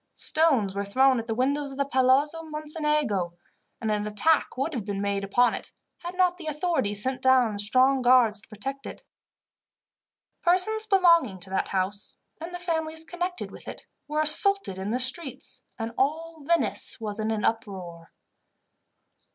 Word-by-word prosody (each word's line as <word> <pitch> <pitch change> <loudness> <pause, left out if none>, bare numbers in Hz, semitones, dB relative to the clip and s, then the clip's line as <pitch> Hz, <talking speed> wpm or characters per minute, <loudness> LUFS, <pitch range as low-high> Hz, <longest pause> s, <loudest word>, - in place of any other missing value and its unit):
Stones 270 -12 +1
were 200 0 -3
thrown 260 +5 +3
at 230 - -7
the 225 - -2
windows 280 +4 0
of 270 - -9
the 280 - 0
Palazzo 275 +4 +2
Mocenigo, 300 - -2 0.5
and 220 -2 -2
an 210 0 -1
attack 270 +8 +1
would 280 +5 -2
have 240 -6 -3
been 200 -1 -4
made 200 0 -2
upon 245 +5 +2
it, - - -7 0.3
had 350 +1 -7
not 360 -1 +2
the 335 -3 -9
authorities 300 - +1
sent 260 0 -2
down 250 -5 +3
strong 255 +6 +3
guards 245 -4 +4
to - - -20
protect 270 +6 -6
it. - - -10 1.4
Persons 435 +5 +2
belonging 335 - +3
to 190 +1 -9
that 190 - -1
house, 195 +2 -3 0.2
and 330 +2 -7
the 355 - -5
families 320 -2 -1
connected 355 +2 -4
with - - -13
it, - - -9 0.2
were 300 +1 -1
assaulted 310 - +4
in 190 +2 -4
the 245 +3 -1
streets, 265 +3 -4 0.2
and 225 0 -4
all 320 +4 -1
Venice 340 -5 +1
was 215 -1 -5
in 215 0 -1
an 220 -1 -1
uproar. 185 -7 -4
260 Hz, 165 wpm, -26 LUFS, 210-320 Hz, 1.4 s, guards